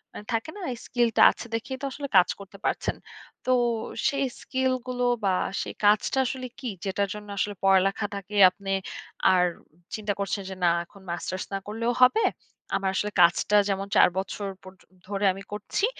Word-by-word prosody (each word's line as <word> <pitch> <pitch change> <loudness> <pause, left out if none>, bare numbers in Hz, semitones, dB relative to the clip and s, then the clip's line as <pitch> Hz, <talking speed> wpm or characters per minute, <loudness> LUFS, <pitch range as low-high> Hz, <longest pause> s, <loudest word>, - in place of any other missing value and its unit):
আ - - -6 0.2
থাকে 225 +6 -1
না? 415 - -8
এই - - -8
স্কিলটা 240 -2 +2
আছে - - -9
দেখেই 260 +4 -4
তো - - -3
আসলে 280 +1 -5
কাজ 180 - +6
করতে 200 0 -12
পারছেন। - - 0 0.5
তো, 255 - +1 0.6
সেই 275 -1 0 0.2
স্কিল 260 0 0 0.2
গুলো 250 -1 -2 0.2
বা 195 -2 +3 0.3
সেই - - -5
কাজটা 210 +5 +3
আসলে 255 +1 -3
কী? 260 - -5 0.2
যেটার 200 +1 0
জন্য 210 0 -9
আসলে 205 +1 -1
পড়ালেখাটাকে 195 +1 +1
আপনি 195 +1 -7 0.6
আর 180 -1 +4 0.5
চিন্তা 210 -1 -2
করছেন 200 +1 -1
যে, 190 - -6
না - - +5 0.2
এখন 200 +3 -18
মাস্টার্স 185 +2 -3
না - - +1
করলেও 230 +3 -1
হবে। 255 - +6 0.5
আমার 195 - 0
আসলে 210 +2 -1
কাজটা 175 +4 +4
যেমন 195 0 -1
৪ - - +7
বছর 195 +1 -3 0.2
পর্যন্ত, 185 -1 -16 0.2
ধরে 200 0 -1
আমি 195 +1 -9
করছি। 210 - -1
205 Hz, 175 wpm, -26 LUFS, 195-240 Hz, 0.6 s, ৪